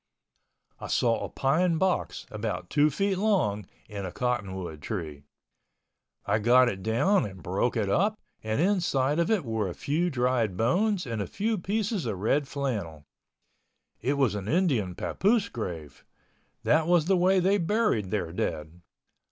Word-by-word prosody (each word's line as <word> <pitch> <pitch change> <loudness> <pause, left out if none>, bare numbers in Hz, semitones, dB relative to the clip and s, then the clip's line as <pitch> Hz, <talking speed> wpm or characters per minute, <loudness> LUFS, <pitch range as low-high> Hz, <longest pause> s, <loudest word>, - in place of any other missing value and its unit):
I - - -6
saw 115 -2 +1
a - - -4
pine 165 +5 +1
box 190 +1 -1
about 110 0 -4
two 150 +1 +4
feet 195 +5 -1
long 145 - +1 0.2
in 100 -1 -6
a 95 - -4
cottonwood 95 -9 -3
tree. 75 -5 -5 1.0
I 110 - +1
got 125 +3 +5
it 95 -4 -5
down 145 - +2
and 95 -3 -8
broke 100 +7 0
it 105 -3 0
up 200 - +1 0.2
and 110 +3 -2
inside 165 -6 +1
of 170 - +1
it 210 -9 +1
were 110 -4 -1
a 85 - -7
few 165 +5 0
dried 125 - 0
bones 180 - +1
and 115 -4 -3
a - - -3
few 220 +2 -1
pieces 205 - -2
of 105 -4 -2
red 135 +9 +1
flannel. 105 - -4 1.0
It 130 +5 +1
was 135 -6 +2
an 100 -1 -5
Indian 130 - +1
papoose 200 - +1
grave—that 85 - -4
was 175 -3 +4
the 190 +2 +3
way 185 +2 +3
they 195 +3 +2
buried 170 - +1
their 95 -6 -2
dead. 80 -1 -4
125 Hz, 155 wpm, -27 LUFS, -, 1.0 s, got